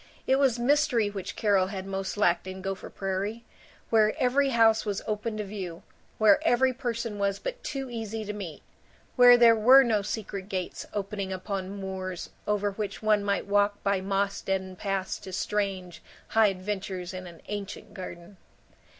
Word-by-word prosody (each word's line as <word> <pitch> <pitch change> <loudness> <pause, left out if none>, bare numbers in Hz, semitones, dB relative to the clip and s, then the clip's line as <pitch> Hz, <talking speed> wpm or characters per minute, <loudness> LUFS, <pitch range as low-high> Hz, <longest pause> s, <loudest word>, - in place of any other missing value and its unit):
It 265 - +3
was 270 -4 +3
mystery 245 -4 +2
which 195 -2 -6
Carol 200 -3 +2
had 190 -1 -5
most 195 0 -4
lacked 175 -3 +2
in 185 0 -7
Gopher 195 0 -4
Prairie, 195 +4 -3 0.5
where 215 -1 +4
every 270 +2 +2
house 225 -3 +4
was 205 -2 -3
open 215 +1 -3
to 210 - -2
view, 190 -4 -6 0.3
where 210 -2 +6
every 260 +2 +3
person 235 -4 -3
was 200 -1 +1
but - - -6
too 270 -2 -4
easy 225 -2 -5
to 210 - -4
meet, 190 -7 -7 0.5
where 245 -1 +8
there 235 -1 +7
were 255 +5 +7
no 220 -4 +1
secret 200 -1 -5
gates 185 -3 -4
opening 200 -1 -3
upon 190 +1 -4
moors 190 -2 -5 0.2
over 205 -1 +1
which 205 +1 -5
one 215 -1 +3
might 200 0 0
walk 205 0 +1
by 200 -1 +1
moss 195 +1 -1
deadened 190 -1 -3
paths 195 -2 -2
to 190 - -9
strange 190 -2 -2 0.3
high 220 -1 +5
adventures 190 -1 -4
in 185 0 -6
an 170 -1 -12
ancient 205 0 -6
garden. 185 -1 -9
205 Hz, 165 wpm, -28 LUFS, 190-225 Hz, 0.5 s, where